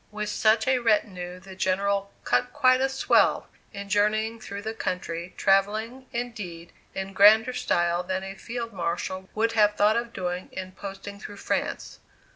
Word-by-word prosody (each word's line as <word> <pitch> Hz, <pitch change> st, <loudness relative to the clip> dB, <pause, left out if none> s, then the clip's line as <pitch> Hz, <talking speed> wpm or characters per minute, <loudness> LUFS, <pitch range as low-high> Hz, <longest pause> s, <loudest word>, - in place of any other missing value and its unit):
With 210 Hz, 0 st, -4 dB
such 220 Hz, +2 st, +2 dB
a 260 Hz, -1 st, +3 dB
retinue 185 Hz, -6 st, 0 dB
the 190 Hz, +1 st, -12 dB
General 200 Hz, +1 st, 0 dB
"cut 125 Hz, -, +1 dB
quite 255 Hz, -3 st, +4 dB
a 270 Hz, -, +2 dB
swell" 270 Hz, -, +2 dB, 0.2 s
in 200 Hz, 0 st, -7 dB
journeying 215 Hz, +3 st, +1 dB
through 200 Hz, -2 st, -7 dB
the 220 Hz, +1 st, -3 dB
country, 180 Hz, -4 st, -4 dB
travelling, 215 Hz, +6 st, +1 dB
indeed, 210 Hz, -9 st, -6 dB, 0.2 s
in 190 Hz, 0 st, -4 dB
grander 220 Hz, +5 st, +6 dB
style 175 Hz, -7 st, +1 dB
than 185 Hz, +1 st, -3 dB
a 195 Hz, 0 st, -6 dB
Field 230 Hz, +3 st, -6 dB
Marshal 185 Hz, +1 st, -3 dB
would 225 Hz, +1 st, +2 dB
have 210 Hz, -2 st, +3 dB
thought 210 Hz, +2 st, +3 dB
of 235 Hz, 0 st, -3 dB
doing 180 Hz, -3 st, -4 dB
in 185 Hz, 0 st, -6 dB
posting 200 Hz, +1 st, -8 dB
through 205 Hz, -1 st, -9 dB
France. -, -, -3 dB
200 Hz, 160 wpm, -26 LUFS, 185-225 Hz, 0.2 s, grander